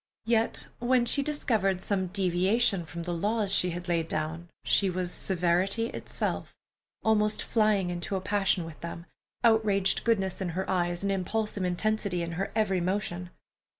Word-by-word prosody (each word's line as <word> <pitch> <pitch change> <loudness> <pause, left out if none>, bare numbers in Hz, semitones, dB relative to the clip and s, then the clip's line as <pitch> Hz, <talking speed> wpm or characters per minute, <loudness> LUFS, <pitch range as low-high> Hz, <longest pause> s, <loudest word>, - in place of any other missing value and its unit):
Yet 230 0 +1
when 245 0 +3
she 280 +4 +2
discovered 225 -10 0
some 190 -1 -1
deviation 190 +2 +2
from 170 +1 -6
the 175 0 -3
laws 205 +3 0
she 180 - +5
had 175 +1 -5
laid 165 -2 0
down, 160 +2 -3 0.2
she 195 - +3
was 180 -1 -2
severity 190 +6 +1
itself, - - -3 0.5
almost 215 -1 +2
flying 210 -5 +2
into 175 +3 -3
a - - 0
passion 195 -2 +1
with 165 -2 -10
them, 170 0 -7 0.4
outraged 215 -4 +3
goodness 195 -6 0
in 185 - -1
her 190 - -1
eyes, 175 -1 0
and 200 - +1
impulsive 200 +1 -1
intensity 185 0 0
in 170 - -4
her 185 +4 -3
every 195 -5 +1
motion. 180 -1 -2
190 Hz, 155 wpm, -28 LUFS, 175-215 Hz, 0.5 s, she